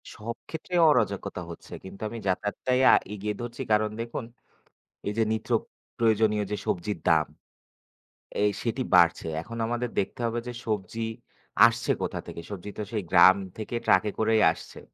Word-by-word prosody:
সব 115 Hz, +2 st, -5 dB
ক্ষেত্রে 165 Hz, +3 st, -5 dB
অরাজকতা 105 Hz, -9 st, 0 dB
হচ্ছে। 85 Hz, -, -11 dB
কিন্তু 95 Hz, +1 st, -11 dB
আমি 115 Hz, -, -7 dB
যাতায়াতটাই 105 Hz, +7 st, 0 dB
আ -, -, +7 dB, 0.2 s
এগিয়ে 105 Hz, +1 st, -3 dB
ধরছি 120 Hz, +1 st, -6 dB
কারন 105 Hz, 0 st, +3 dB
দেখুন, 115 Hz, 0 st, -5 dB, 0.8 s
এই 105 Hz, -, -1 dB
যে -, -, +4 dB
নিত্য 110 Hz, -, -4 dB, 0.5 s
প্রয়োজনীয় 110 Hz, -2 st, +3 dB
যে 105 Hz, -, -1 dB
সবজির 90 Hz, +2 st, -1 dB
দাম। 80 Hz, -2 st, +4 dB, 1.2 s
এই 105 Hz, -, +4 dB
সেটি 120 Hz, +2 st, -1 dB
বাড়ছে। 85 Hz, -2 st, +4 dB
এখন 115 Hz, +6 st, -8 dB
আমাদের 120 Hz, +1 st, -2 dB
দেখতে 95 Hz, -, -3 dB
হবে 115 Hz, 0 st, -1 dB
যে, 125 Hz, -, -4 dB
সবজি 110 Hz, +1 st, -2 dB, 0.6 s
আসছে 115 Hz, 0 st, -1 dB
কোথা -, -, -2 dB
থেকে? -, -, -7 dB
সবজি 100 Hz, -1 st, -6 dB
তো 105 Hz, -, -2 dB
সেই 105 Hz, -3 st, -2 dB
গ্রাম 95 Hz, +1 st, +8 dB, 0.2 s
থেকে 110 Hz, +2 st, -5 dB
ট্রাকে 105 Hz, -, +4 dB
করেই 110 Hz, 0 st, +3 dB
আসছে। -, -, -10 dB
110 Hz, 155 wpm, -27 LUFS, 100-115 Hz, 1.2 s, গ্রাম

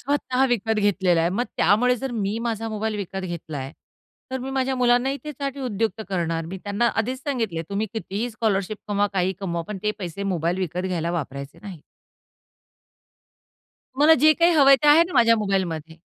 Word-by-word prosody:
स्वतः 265 Hz, -2 st, 0 dB
विकत 225 Hz, -2 st, 0 dB
घेतलेला 190 Hz, -4 st, +2 dB
आहे. 165 Hz, -, +2 dB
मग 225 Hz, +7 st, 0 dB
त्यामुळे 250 Hz, +4 st, +3 dB
जर 270 Hz, +2 st, -4 dB
मी 210 Hz, -1 st, -2 dB
माझा 225 Hz, -1 st, -3 dB
मोबाईल 215 Hz, 0 st, -2 dB
विकत 195 Hz, -1 st, -5 dB
घेतलाय, 155 Hz, -6 st, -6 dB, 0.6 s
तर 260 Hz, -, -2 dB
मी 260 Hz, +1 st, -5 dB
माझ्या 265 Hz, 0 st, 0 dB
मुलांनाही 250 Hz, +2 st, +2 dB
त्यासाठी 280 Hz, -2 st, -5 dB
उदयुक्त 225 Hz, -2 st, -2 dB
करणार. 165 Hz, -3 st, -1 dB
मी 190 Hz, +3 st, -6 dB
त्यांना 205 Hz, +3 st, 0 dB
आधीच 250 Hz, +4 st, -1 dB
सांगितले 225 Hz, -, -2 dB
तुम्ही 200 Hz, +2 st, -1 dB
कितीही 220 Hz, +1 st, -3 dB
स्कॉलरशिप 215 Hz, -2 st, -1 dB
कमवा, 205 Hz, 0 st, +2 dB
काहीही 190 Hz, -1 st, +1 dB
कमवा, 170 Hz, -3 st, -2 dB
पण 210 Hz, -2 st, -5 dB
ते 210 Hz, -, +1 dB
पैसे 185 Hz, 0 st, -5 dB
मोबाईल 175 Hz, -2 st, -1 dB
विकत 180 Hz, -1 st, -2 dB
घ्यायला 170 Hz, -2 st, -2 dB
वापरायचे 140 Hz, -4 st, -5 dB
नाहीत. 190 Hz, -6 st, -9 dB, 2.2 s
मला 300 Hz, +3 st, +6 dB
जे 310 Hz, 0 st, +8 dB
काही 335 Hz, +2 st, +3 dB
हवंय 275 Hz, -3 st, +7 dB
ते 295 Hz, -, +4 dB
आहे 305 Hz, +3 st, +8 dB
ना 360 Hz, -, -9 dB
माझ्या 230 Hz, -3 st, +5 dB
मोबाईलमध्ये. 175 Hz, -6 st, -2 dB
210 Hz, 170 wpm, -23 LUFS, 180-250 Hz, 2.2 s, जे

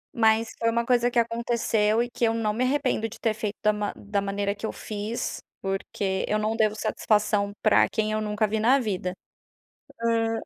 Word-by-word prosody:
mas 225 Hz, -1 st, +3 dB
foi 230 Hz, -, +2 dB
uma 235 Hz, 0 st, 0 dB
coisa 245 Hz, -1 st, +3 dB
que 240 Hz, -, -4 dB
aconteceu 230 Hz, -1 st, +1 dB
e 240 Hz, -, -5 dB
que 240 Hz, -, -5 dB
eu 225 Hz, -, +2 dB
não 215 Hz, -2 st, 0 dB
me 245 Hz, +4 st, 0 dB
arrependo 255 Hz, -4 st, 0 dB
de 220 Hz, -, -12 dB
ter 225 Hz, -2 st, +1 dB
feito 215 Hz, -1 st, -4 dB
da 215 Hz, -, +4 dB
ma 210 Hz, -1 st, -2 dB
da 205 Hz, 0 st, -2 dB
maneira 200 Hz, 0 st, -1 dB
que 205 Hz, -, -6 dB
eu -, -, -2 dB
fiz, 215 Hz, +2 st, -4 dB, 0.2 s
porque 195 Hz, 0 st, -2 dB
eu 210 Hz, -, +1 dB
não 215 Hz, +1 st, 0 dB
devo 215 Hz, -2 st, +2 dB
satisfação 210 Hz, -1 st, +1 dB
pra 215 Hz, -, +5 dB
quem 215 Hz, -1 st, -1 dB
eu 215 Hz, -, 0 dB
nunca 210 Hz, 0 st, 0 dB
vi 220 Hz, +1 st, -1 dB
na 250 Hz, +6 st, +4 dB
vida. 185 Hz, -6 st, -2 dB, 0.9 s
Hã, 225 Hz, -1 st, +1 dB
220 Hz, 200 wpm, -26 LUFS, 210-230 Hz, 0.9 s, pra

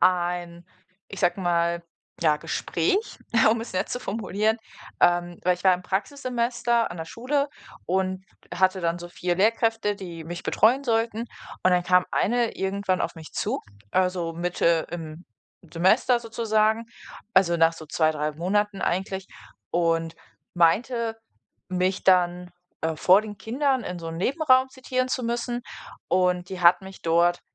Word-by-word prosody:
ein, 175 Hz, -1 st, 0 dB, 0.4 s
ich 195 Hz, -, -8 dB
sage 185 Hz, -, +1 dB
mal, 170 Hz, -1 st, +1 dB, 0.4 s
ja 155 Hz, -2 st, +3 dB
Gespräch, 170 Hz, -, -1 dB, 0.3 s
um 230 Hz, -, +1 dB
es 230 Hz, -, -7 dB
nett 185 Hz, +2 st, -1 dB
zu -, -, -3 dB
formulieren. 215 Hz, 0 st, -1 dB, 0.4 s
Ähm, 175 Hz, 0 st, +2 dB
weil 180 Hz, 0 st, +3 dB
ich 180 Hz, -, -15 dB
war 185 Hz, -, +6 dB
im 180 Hz, -, -7 dB
Praxissemester 235 Hz, +2 st, -1 dB
an 175 Hz, -, -7 dB
der 160 Hz, -, -4 dB
Schule 280 Hz, -, -1 dB, 0.4 s
und 185 Hz, +1 st, -1 dB, 0.3 s
hatte 185 Hz, +1 st, +2 dB
dann 170 Hz, 0 st, -1 dB
so 175 Hz, 0 st, -8 dB
4 175 Hz, 0 st, -2 dB
Lehrkräfte, 225 Hz, 0 st, +1 dB
die 175 Hz, -4 st, -8 dB
mich 175 Hz, +2 st, -7 dB
betreuen 260 Hz, +5 st, +3 dB
sollten. 225 Hz, -2 st, 0 dB, 0.4 s
Und 185 Hz, -, +4 dB
dann 180 Hz, -1 st, +3 dB
kam 180 Hz, 0 st, +4 dB
Eine 240 Hz, +1 st, +1 dB
irgendwann 190 Hz, -1 st, -1 dB
auf -, -, -2 dB
mich 160 Hz, -1 st, -11 dB
zu. -, -, -2 dB, 0.3 s
Äh, 185 Hz, -, +2 dB
so 170 Hz, -2 st, -3 dB
Mitte 170 Hz, -1 st, +1 dB
im 165 Hz, 0 st, -7 dB, 0.5 s
Semester 215 Hz, +8 st, +3 dB
sozusagen. 220 Hz, -1 st, +1 dB, 0.5 s
Also, 180 Hz, -2 st, +4 dB
nach 165 Hz, 0 st, +4 dB
so 160 Hz, -1 st, -11 dB
2, 155 Hz, +1 st, +2 dB
3 150 Hz, 0 st, -2 dB
Monaten 200 Hz, +5 st, -1 dB
eigentlich 190 Hz, +1 st, -2 dB, 0.4 s
und 165 Hz, -1 st, 0 dB, 0.4 s
meinte, 225 Hz, +7 st, +2 dB, 0.5 s
mich 185 Hz, +1 st, -1 dB
dann, 180 Hz, -1 st, +3 dB, 0.3 s
äh, 160 Hz, 0 st, 0 dB
vor 185 Hz, +6 st, +5 dB
den 210 Hz, -1 st, -8 dB
Kindern 260 Hz, +3 st, 0 dB
in 180 Hz, -4 st, -5 dB
so 165 Hz, -1 st, -6 dB
'n 165 Hz, -, -6 dB
Nebenraum 260 Hz, -, +3 dB
zitieren 255 Hz, -1 st, -2 dB
zu 255 Hz, 0 st, -2 dB
müssen. 240 Hz, +1 st, -2 dB, 0.5 s
Und 180 Hz, 0 st, +1 dB
die 185 Hz, -1 st, -6 dB
hat 175 Hz, +1 st, +6 dB
mich 190 Hz, 0 st, -11 dB
dort 170 Hz, +1 st, +3 dB
185 Hz, 155 wpm, -25 LUFS, 175-225 Hz, 0.5 s, war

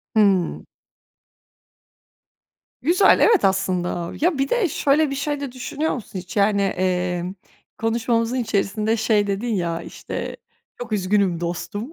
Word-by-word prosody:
Hımm. 195 Hz, -5 st, +2 dB, 2.1 s
Güzel, 360 Hz, +7 st, +5 dB
evet, 445 Hz, -4 st, +5 dB
aslında. 180 Hz, -3 st, 0 dB
Ya, 335 Hz, -2 st, +2 dB
bir 275 Hz, 0 st, 0 dB
de 450 Hz, -8 st, +2 dB
şöyle 290 Hz, +2 st, +2 dB
bir 275 Hz, -, -3 dB
şey 290 Hz, +1 st, -2 dB
de 280 Hz, -3 st, -5 dB
düşünüyor 295 Hz, +5 st, -2 dB
musun 205 Hz, -6 st, -6 dB
hiç? 180 Hz, +1 st, -8 dB
Yani, 200 Hz, 0 st, +3 dB
emm, 180 Hz, -1 st, -1 dB, 0.4 s
konuşmamızın 230 Hz, +1 st, 0 dB
içerisinde, 215 Hz, 0 st, 0 dB
şey, 215 Hz, -2 st, +2 dB
dedin 210 Hz, +3 st, -1 dB
ya, 170 Hz, -2 st, -2 dB
işte, -, -, -6 dB, 0.4 s
"Çok 235 Hz, -2 st, -7 dB
üzgünüm 195 Hz, -3 st, +1 dB
dostum." 205 Hz, -, -4 dB
215 Hz, 125 wpm, -22 LUFS, 185-260 Hz, 2.1 s, Güzel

